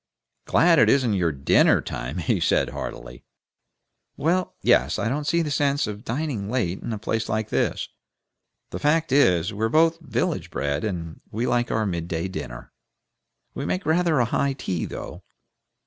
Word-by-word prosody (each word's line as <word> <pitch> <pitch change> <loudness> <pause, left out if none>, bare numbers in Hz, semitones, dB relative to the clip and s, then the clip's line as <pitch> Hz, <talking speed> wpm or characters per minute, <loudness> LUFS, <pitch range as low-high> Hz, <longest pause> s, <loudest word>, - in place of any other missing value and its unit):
"Glad 165 -2 +4
it - - +5
isn't 130 -5 +3
your 90 -4 +1
DINNER 70 -1 +4
time!" 65 +8 -5
he 85 - 0
said, - - +2
heartily. - - -7 0.9
"Well, 180 +4 0
yes. - - +3
We - - -2
don't 145 +5 -2
see 170 0 +2
the 150 - -3
sense 145 0 +1
of 105 +1 -6
dining 125 -5 -3
late 105 -7 -1
in - - -5
a 110 - -2
place 110 +1 -2
like 110 0 -1
this. - - 0 0.8
The - - -4
fact 155 +1 +1
is, 95 - +3
we're 110 +2 -1
both 165 +5 +3
village 160 - -2
bred, 70 +1 -2
and 85 -6 -4
we 115 +4 -2
like 120 0 +1
the 110 -1 0
mid 85 -4 -3
day 85 +1 -2
dinner. - - -7 0.8
We 140 - -5
make 185 - -2
rather 165 0 +2
a 120 - +3
high 135 +4 0
tea, 90 - -3
though." - - -7
115 Hz, 170 wpm, -24 LUFS, 90-145 Hz, 0.9 s, it